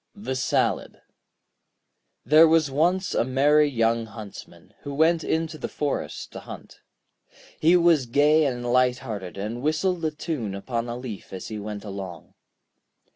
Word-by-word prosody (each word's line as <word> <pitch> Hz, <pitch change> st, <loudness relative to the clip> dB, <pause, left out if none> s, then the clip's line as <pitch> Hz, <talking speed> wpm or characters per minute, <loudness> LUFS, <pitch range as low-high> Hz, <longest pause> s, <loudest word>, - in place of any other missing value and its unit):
] -, -, -50 dB
The 130 Hz, -, -1 dB
Salad 130 Hz, -, 0 dB, 1.3 s
There 155 Hz, +2 st, +7 dB
was 160 Hz, -3 st, +3 dB
once 180 Hz, +6 st, +1 dB
a -, -, +2 dB
merry 145 Hz, +4 st, +3 dB
young 115 Hz, -2 st, +1 dB
Huntsman, 110 Hz, -1 st, -11 dB
who 140 Hz, -1 st, -6 dB
went 160 Hz, +2 st, +3 dB
into 160 Hz, -1 st, -2 dB
the -, -, -3 dB
forest 145 Hz, -2 st, -4 dB
to -, -, -8 dB
hunt. -, -, -11 dB, 0.8 s
He 170 Hz, +3 st, +5 dB
was 165 Hz, -7 st, +3 dB
gay 150 Hz, +5 st, +4 dB
and 120 Hz, -2 st, -4 dB
light 125 Hz, -1 st, +3 dB
hearted, 100 Hz, -6 st, -6 dB
and 110 Hz, +5 st, -4 dB
whistled 165 Hz, +4 st, 0 dB
a 160 Hz, -, +2 dB
tune 150 Hz, -, -4 dB
upon 115 Hz, +3 st, -3 dB
a 120 Hz, -, -4 dB
leaf 125 Hz, -5 st, -8 dB
as 95 Hz, -1 st, -7 dB
he 110 Hz, -1 st, -5 dB
went 105 Hz, 0 st, -6 dB
along. 95 Hz, -5 st, -8 dB
130 Hz, 155 wpm, -25 LUFS, 115-155 Hz, 1.3 s, There